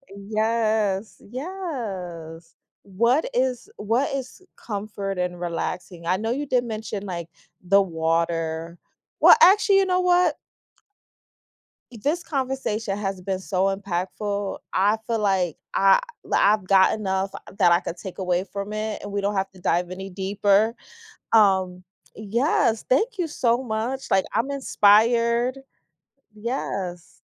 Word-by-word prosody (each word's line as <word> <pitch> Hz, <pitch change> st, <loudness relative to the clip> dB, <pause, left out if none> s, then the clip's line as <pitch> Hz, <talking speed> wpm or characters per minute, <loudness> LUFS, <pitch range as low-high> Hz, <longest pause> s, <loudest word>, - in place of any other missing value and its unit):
Yes, 215 Hz, -1 st, -1 dB
yes. 195 Hz, -, -6 dB, 0.3 s
What 235 Hz, -, +1 dB
is 250 Hz, -1 st, -1 dB
what 235 Hz, +7 st, 0 dB
is 265 Hz, +6 st, -6 dB
comfort 200 Hz, -2 st, -5 dB
and 180 Hz, -1 st, -2 dB
relaxing, 175 Hz, 0 st, -4 dB
I 185 Hz, -, +3 dB
know 225 Hz, +3 st, -2 dB
you 285 Hz, +3 st, -2 dB
did 250 Hz, -2 st, +1 dB
mention, 215 Hz, -3 st, -5 dB
like, 170 Hz, -3 st, -5 dB, 0.3 s
the 195 Hz, +2 st, +4 dB
water 165 Hz, -1 st, -1 dB, 0.4 s
Well, -, -, +9 dB
actually, 395 Hz, -1 st, +6 dB
you 385 Hz, -, +3 dB
know 365 Hz, -1 st, +1 dB
what? 355 Hz, -3 st, +3 dB, 1.6 s
this 290 Hz, +10 st, -2 dB
conversation 260 Hz, -, -2 dB
has 195 Hz, -2 st, -3 dB
been 190 Hz, 0 st, -2 dB
so 190 Hz, 0 st, 0 dB
impactful, 200 Hz, +2 st, -3 dB
I 205 Hz, +3 st, +3 dB
feel 230 Hz, -2 st, -1 dB
like 190 Hz, -5 st, +1 dB, 0.2 s
I 195 Hz, 0 st, +5 dB, 0.2 s
l -, -, -11 dB
I've 205 Hz, -2 st, +3 dB
got 190 Hz, +1 st, +5 dB
enough 190 Hz, -1 st, -1 dB, 0.3 s
that 175 Hz, -, +5 dB
I 170 Hz, -, +4 dB
could 175 Hz, -, -6 dB
take 185 Hz, +2 st, -9 dB
away 180 Hz, 0 st, 0 dB
from 200 Hz, +1 st, -6 dB
it 215 Hz, 0 st, -3 dB
and 205 Hz, -, -7 dB
we 200 Hz, -, -1 dB
don't 200 Hz, +1 st, -1 dB
have 195 Hz, 0 st, -1 dB
to 185 Hz, -, -16 dB
dive 175 Hz, +1 st, 0 dB
any 190 Hz, +1 st, -7 dB
deeper, 200 Hz, +3 st, +1 dB, 0.6 s
um, 190 Hz, -4 st, +3 dB, 0.3 s
yes, 225 Hz, +1 st, +1 dB
thank 435 Hz, -, +2 dB
you 340 Hz, -, 0 dB
so 245 Hz, -3 st, 0 dB
much, 240 Hz, +4 st, -3 dB
like 190 Hz, -1 st, +3 dB
I'm 235 Hz, +6 st, 0 dB
inspired. 235 Hz, +1 st, +3 dB, 0.8 s
Yes. 200 Hz, -6 st, -5 dB
205 Hz, 135 wpm, -24 LUFS, 185-235 Hz, 1.6 s, Well